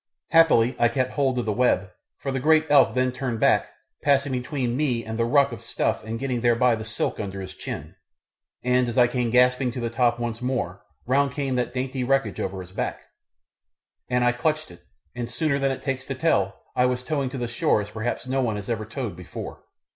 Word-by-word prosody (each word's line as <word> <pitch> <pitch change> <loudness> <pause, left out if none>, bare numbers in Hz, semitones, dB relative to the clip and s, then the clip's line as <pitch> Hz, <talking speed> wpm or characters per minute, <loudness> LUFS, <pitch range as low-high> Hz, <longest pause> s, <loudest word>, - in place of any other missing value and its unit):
Happily 135 -8 +5
I 120 - +5
kept 130 +2 -1
hold 135 -3 +1
of 120 - -1
the 105 - 0
web, 100 -5 +2 0.3
for 135 - -4
the 135 - -1
great 155 +3 +4
elk 140 -3 +6
then 130 0 +2
turned 125 -2 -3
back, - - +3 0.3
passing 140 -1 +2
between 125 -1 -2
me 125 -5 0
and 110 0 -4
the 115 - +3
ruck 140 +2 +4
of 115 - -7
stuff - - -1
and 110 +1 -4
getting 125 -1 -2
thereby 120 +1 +4
the 110 -1 -3
silk 110 0 -2
under 100 -2 -4
his 95 -1 -7
chin, - - -7 0.7
and 125 0 +2
as 120 - -5
I 125 - +7
came 120 0 -1
gasping 125 +1 +3
to 125 - -4
the 115 -1 -2
top 120 0 +2
once 120 -1 -4
more 120 -8 -2 0.2
round 135 +1 +2
came 140 -3 -2
that 125 0 -2
dainty 130 0 -2
wreckage 125 -6 +1
over 95 0 -3
his 90 0 -11
back, - - -3 1.1
and 125 0 +2
I 120 - +5
clutched 155 +6 -1
it, - - -15 0.3
and 120 -1 -4
sooner 150 -3 0
than 135 0 +2
it 135 - -4
takes 135 -2 -2
to 135 - -4
tell 165 +4 0
I 125 - +4
was 125 0 -1
towing 140 -2 -1
to 135 - -6
the 120 -1 -2
shore 120 -2 +1
as 105 - -10
perhaps 110 +3 -3
no 130 +1 0
one 115 -4 0
was 105 +3 -4
ever 110 -2 -2
towed 110 -4 -4
before. 90 0 -8
125 Hz, 220 wpm, -25 LUFS, 115-135 Hz, 1.1 s, I